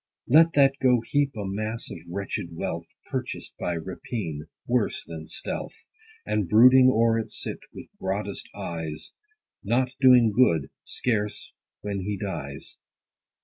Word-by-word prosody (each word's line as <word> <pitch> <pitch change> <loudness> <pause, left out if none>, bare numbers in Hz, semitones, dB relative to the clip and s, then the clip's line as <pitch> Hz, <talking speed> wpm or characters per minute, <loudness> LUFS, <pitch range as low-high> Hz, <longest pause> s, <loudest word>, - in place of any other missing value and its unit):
Let 165 +5 +6
that 140 -1 +4
go 125 -3 +4
heap 140 0 +1
a 105 -2 -4
mass 110 +4 -3
of 85 - -7
wretched 100 +2 -4
wealth, - - -4 0.2
Purchased - - -4
by 90 - -1
rapine, 85 -2 -5 0.2
worse 120 -3 0
than 80 -1 -8
stealth, - - -4 0.5
And 100 -5 -1
brooding 130 +4 +7
o'er 115 -1 +3
it 110 - -4
sit, - - -4
with - - -10
broadest 100 +1 -3
eyes, 80 -2 -5 0.5
Not 125 +5 +1
doing 125 -4 +7
good, 90 - +3
scarce 105 -4 -2 0.3
when.he 100 0 -3
dies. 80 -9 -6
105 Hz, 130 wpm, -26 LUFS, 95-125 Hz, 0.5 s, brooding